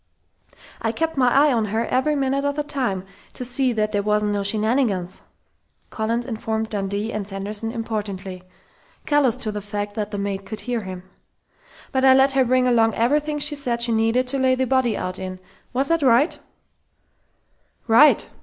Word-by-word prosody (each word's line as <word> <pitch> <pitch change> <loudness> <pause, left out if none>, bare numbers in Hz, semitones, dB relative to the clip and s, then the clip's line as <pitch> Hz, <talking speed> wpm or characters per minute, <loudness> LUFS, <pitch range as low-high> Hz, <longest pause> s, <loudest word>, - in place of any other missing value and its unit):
"I 225 - 0
kept 325 +6 -2
my 250 -3 +3
eye 285 +1 +4
on 225 -2 +1
her 220 +3 -1
every 280 +4 +1
minute 275 0 0
of 285 0 -1
the 295 - -1
time, 250 -11 -2 0.3
to 250 - -5
see 250 +1 +1
that 215 -1 0
there 205 -1 0
wasn't 210 0 +1
no 205 -1 -1
shenanigans," 210 -3 0 0.7
Collins 230 +2 -2
informed 220 -2 -3
Dundee 205 +2 -2
and 210 -2 -4
Sanderson 205 +3 -4
importantly, 205 -5 -5 0.6
callous 290 -6 +2
to 215 - -3
the 210 0 -5
fact 205 0 -4
that 210 -1 -3
the 205 - -5
maid 200 -1 -3
could 210 +2 -7
hear 245 -2 -2
him. 185 -2 -8 0.9
"But 265 0 0
I 265 -1 +7
let 270 +1 +4
her 270 -1 +3
bring 255 +1 +2
along 225 -2 +3
everything 295 +6 +1
she 295 +1 +2
said 245 -5 0
she 235 - +2
needed 225 +3 +2
to 275 +1 0
lay 260 0 +3
the 260 0 0
body 255 -4 +1
out 185 0 -4
in.... 185 -1 -6 0.3
Was 265 +4 0
that 330 -1 +2
right?" 265 +4 +3 1.5
"Right!" 250 +7 +5
230 Hz, 180 wpm, -22 LUFS, 210-265 Hz, 1.5 s, I